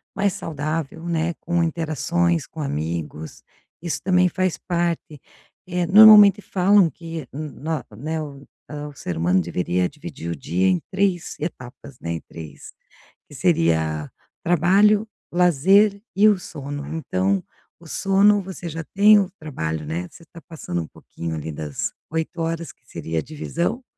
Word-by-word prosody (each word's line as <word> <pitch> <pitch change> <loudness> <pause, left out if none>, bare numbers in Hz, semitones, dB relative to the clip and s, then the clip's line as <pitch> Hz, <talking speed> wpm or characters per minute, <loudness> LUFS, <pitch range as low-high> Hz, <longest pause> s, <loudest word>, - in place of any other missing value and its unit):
mais 200 -1 +1
saudável, 160 -3 -4
né, 170 0 0
com 175 0 0
interações 165 0 0
com 160 - -8
amigos, 80 - -4 0.4
isso 160 -4 -3
também 180 -1 +3
faz 185 -1 -1
parte. 170 -4 -2 0.5
Eh, 180 -1 -1
normalmente 210 0 +9
falam 190 -1 +4
que, 165 -1 -8
n 150 +2 -5
no 155 +1 -4
né, 155 +7 -3 0.5
hã, 150 0 -6
o 145 - -10
ser 90 - -5
humano 90 +3 +2
deveria 90 +1 -1
dividir 85 +1 -7
o - - -3
dia 85 +6 0
em 90 -2 +3
3 190 -3 0
etapas, 135 -4 -7
né, 85 - -4
em 80 - -5
3 80 -4 -11 0.6
que 145 - -13
seria: 80 - +1 0.3
trabalho, 200 +6 +4 0.2
lazer 190 +5 +4
e 205 +3 +6
o 205 -3 +2
sono. 145 -3 -7
Então, 100 - -1 0.4
o - - -15
sono 200 +1 +3
você 185 -2 -7
já 165 +1 -5
tem, 210 +1 +7
o 195 -2 0
trabalho, 80 - -4
né, 85 +4 -4
você - - -16
tá 170 - -12
passando 115 - -4
um 80 - -7
pouquinho 85 +1 -7
ali 80 +1 -5
das 75 -1 -4 0.2
8 160 +2 -3
horas 165 0 -3
que - - -31
seria 80 0 -4
a - - -1
divisão, 170 - -3
160 Hz, 155 wpm, -22 LUFS, -, 0.6 s, normalmente